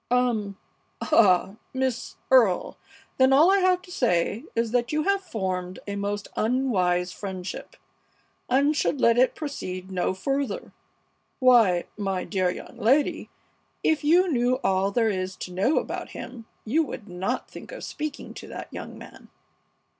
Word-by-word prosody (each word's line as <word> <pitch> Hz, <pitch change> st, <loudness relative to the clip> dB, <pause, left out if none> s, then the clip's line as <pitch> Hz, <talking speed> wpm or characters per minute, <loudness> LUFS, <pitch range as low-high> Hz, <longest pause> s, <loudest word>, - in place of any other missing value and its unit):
"Um! 230 Hz, -5 st, +1 dB, 0.4 s
Ah! 190 Hz, -1 st, +3 dB, 0.2 s
Miss 260 Hz, -2 st, -2 dB, 0.2 s
Earle, 230 Hz, -9 st, +4 dB, 0.4 s
then 260 Hz, 0 st, +6 dB
all 305 Hz, +7 st, +6 dB
I 395 Hz, -, +4 dB
have 365 Hz, -1 st, +2 dB
to 360 Hz, -, -13 dB
say 220 Hz, -, 0 dB
is 230 Hz, -1 st, 0 dB
that 245 Hz, -1 st, +1 dB
you 305 Hz, 0 st, +1 dB
have 395 Hz, +2 st, +1 dB
formed 185 Hz, -, -3 dB
a 200 Hz, -, -4 dB
most 205 Hz, 0 st, -3 dB
unwise 190 Hz, -8 st, +1 dB
friendship, 190 Hz, -1 st, -6 dB, 0.7 s
and 280 Hz, +4 st, +3 dB
should 290 Hz, -, 0 dB
let 235 Hz, 0 st, +4 dB
it 255 Hz, -, +3 dB
proceed 190 Hz, -, -6 dB
no 185 Hz, 0 st, 0 dB
further. 275 Hz, -, -2 dB, 0.6 s
Why, 230 Hz, -9 st, +5 dB
my 195 Hz, -3 st, -2 dB
dear 185 Hz, -3 st, 0 dB
young 180 Hz, -, -7 dB
lady, 270 Hz, +7 st, +2 dB, 0.5 s
if 315 Hz, -1 st, +2 dB
you 345 Hz, +4 st, +4 dB
knew 250 Hz, -1 st, +2 dB
all 190 Hz, +1 st, +2 dB
there 225 Hz, +2 st, +2 dB
is 185 Hz, -1 st, -3 dB
to 180 Hz, -, -7 dB
know 200 Hz, -, +2 dB
about -, -, -3 dB
him 230 Hz, -3 st, -9 dB, 0.2 s
you 280 Hz, +9 st, +2 dB
would 230 Hz, -8 st, -5 dB
not 190 Hz, +8 st, -3 dB
think -, -, -11 dB
of -, -, -8 dB
speaking 300 Hz, -1 st, -5 dB
to -, -, -10 dB
that -, -, -8 dB
young -, -, -7 dB
man." -, -, -13 dB
230 Hz, 155 wpm, -25 LUFS, 190-275 Hz, 0.7 s, then